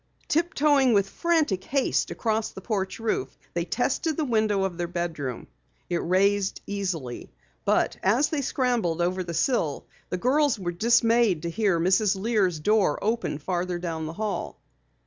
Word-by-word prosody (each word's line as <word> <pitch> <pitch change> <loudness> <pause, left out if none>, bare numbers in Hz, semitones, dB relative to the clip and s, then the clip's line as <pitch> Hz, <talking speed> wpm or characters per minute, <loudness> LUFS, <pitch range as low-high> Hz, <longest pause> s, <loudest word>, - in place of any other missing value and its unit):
Tiptoeing 295 -6 +3
with 200 -2 +3
frantic 310 - 0
haste 275 +3 0
across 220 -1 -1
the - - -10
porch 190 -2 -2
roof, 230 - -2 0.2
they - - -1
tested 320 -4 -1
the 315 - 0
window 215 -5 +1
of 190 -2 -2
their 175 0 -3
bedroom. 165 -8 -4 0.5
It 175 - +2
raised 195 +3 +1
easily. 180 -11 -4 0.3
But - - +2
as 235 +10 +3
they 300 -3 -1
scrambled 240 - 0
over 180 +2 0
the 170 -1 -5
sill, 160 - 0 0.2
the 180 - -2
girls 275 +5 +2
were 180 -3 -3
dismayed 230 -2 +3
to 170 - -2
hear 195 -3 +1
Mrs. 190 +4 +3
Lear's 195 -6 +1
door 200 -3 +2
open 220 -7 -1
farther 180 +3 -2
down 165 -2 -4
the 160 - -6
hall. 210 +2 -4
200 Hz, 155 wpm, -26 LUFS, 175-235 Hz, 0.5 s, Tiptoeing